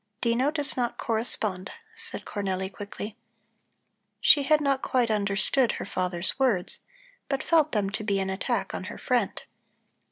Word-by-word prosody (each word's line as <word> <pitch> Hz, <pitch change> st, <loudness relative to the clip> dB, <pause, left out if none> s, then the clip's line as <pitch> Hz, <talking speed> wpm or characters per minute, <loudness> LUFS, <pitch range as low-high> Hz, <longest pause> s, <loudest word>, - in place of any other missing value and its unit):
"Dino 240 Hz, +4 st, +1 dB
does 295 Hz, -2 st, 0 dB
not 240 Hz, -2 st, -1 dB
correspond," 215 Hz, -4 st, +1 dB, 0.2 s
said 460 Hz, +1 st, -6 dB
Cornelli 190 Hz, -2 st, -3 dB
quickly. 205 Hz, +2 st, -7 dB, 1.0 s
She 290 Hz, -, +6 dB
had 300 Hz, +2 st, +3 dB
not 275 Hz, -2 st, +1 dB
quite 245 Hz, -3 st, +1 dB
understood 210 Hz, +5 st, +3 dB
her -, -, -5 dB
father's 180 Hz, +4 st, -1 dB
words, 230 Hz, -10 st, +1 dB, 0.5 s
but 275 Hz, -1 st, -1 dB
felt 315 Hz, -2 st, +3 dB
them 200 Hz, -3 st, 0 dB
to 215 Hz, -, -3 dB
be 200 Hz, -2 st, 0 dB
an 190 Hz, 0 st, -2 dB
attack 190 Hz, -, -2 dB
on -, -, -5 dB
her -, -, -7 dB
friend. -, -, -1 dB
225 Hz, 150 wpm, -27 LUFS, 195-270 Hz, 1.0 s, She